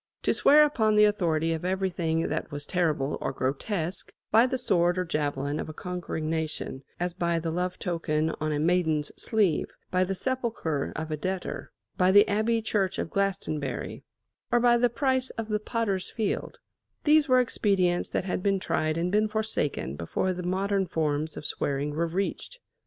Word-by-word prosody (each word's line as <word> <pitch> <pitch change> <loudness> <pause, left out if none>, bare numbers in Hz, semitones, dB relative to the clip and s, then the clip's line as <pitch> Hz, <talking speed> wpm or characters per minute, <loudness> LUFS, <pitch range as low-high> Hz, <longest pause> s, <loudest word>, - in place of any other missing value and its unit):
To - - +3
swear 300 +1 +6
upon 220 -8 +2
the 210 - +6
authority 165 -6 +2
of 160 - -4
everything 180 -3 0
that - - -2
was 145 0 -4
terrible 150 -5 0
or - - -1
grotesque 160 - -2 0.2
by 225 +3 +6
the 260 - -1
sword 175 -7 +2
or 180 - 0
javelin 145 -2 -1
of - - -4
a 155 - -8
conquering 180 -3 -4
nation, 160 -4 -3 0.2
as 175 0 -1
by 170 -1 0
the 165 0 -2
love 180 +2 -2
token 160 -3 -1
on 155 0 0
a 150 - 0
maiden's 160 -2 +1
sleeve; 205 -8 +1 0.2
by 185 0 +3
the 190 +1 -2
sepulchre 230 - -2
of 160 0 -4
a 155 - -1
debtor; 185 +3 -4 0.3
by 185 0 +5
the 205 +1 +7
abbey 225 +2 +1
church 200 -4 0
at - - -3
Glastonbury, 155 -9 -2 0.5
or 240 - +4
by 240 0 +5
the 240 +1 +3
price 260 +1 0
of 225 -1 -4
the 210 0 +1
potter's 210 -4 -1
field 220 -3 -2 0.5
these 305 -1 +4
were 255 0 +6
expedients 195 -7 +1
that - - -1
had 185 - -2
been 195 0 +1
tried 155 -3 0
and 175 +2 0
been 210 +2 +3
forsaken 215 - -2
before 135 - -1
the 180 - -5
modern 190 +2 0
forms 155 -1 -1
of - - -7
swearing 140 +1 -1
were 165 +3 0
reached. 195 - -3
180 Hz, 180 wpm, -27 LUFS, 160-210 Hz, 0.5 s, the